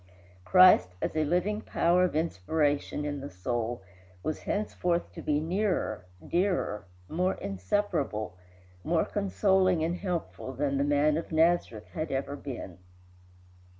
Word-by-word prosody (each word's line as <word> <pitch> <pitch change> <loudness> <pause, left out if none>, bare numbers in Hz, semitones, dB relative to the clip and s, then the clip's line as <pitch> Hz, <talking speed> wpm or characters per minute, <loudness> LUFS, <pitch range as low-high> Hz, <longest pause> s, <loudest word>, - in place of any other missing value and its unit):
Christ, 180 - +6
as - - -2
a 155 - +2
living 180 +7 0
power 175 -2 +2
of 180 - 0
inspiration 150 - 0
in 145 -1 -3
the 140 +1 -6
soul, 120 +3 -3 0.4
was 155 - -2
henceforth 180 -4 -1
to - - -8
be 150 -1 +1
nearer, 165 - -1 0.2
dearer, 175 - 0 0.2
more 180 - 0
inseparable, 110 - -2 0.5
more 165 0 +1
consoling 190 -3 +2
and 170 +2 -1
helpful 175 -8 -4
than 140 +1 -1
the - - +3
man 145 +1 +3
of 165 - -5
Nazareth 160 -9 +2
had 155 -2 -4
ever 135 +1 -2
been. 120 -11 -7
155 Hz, 130 wpm, -29 LUFS, 135-180 Hz, 0.5 s, Christ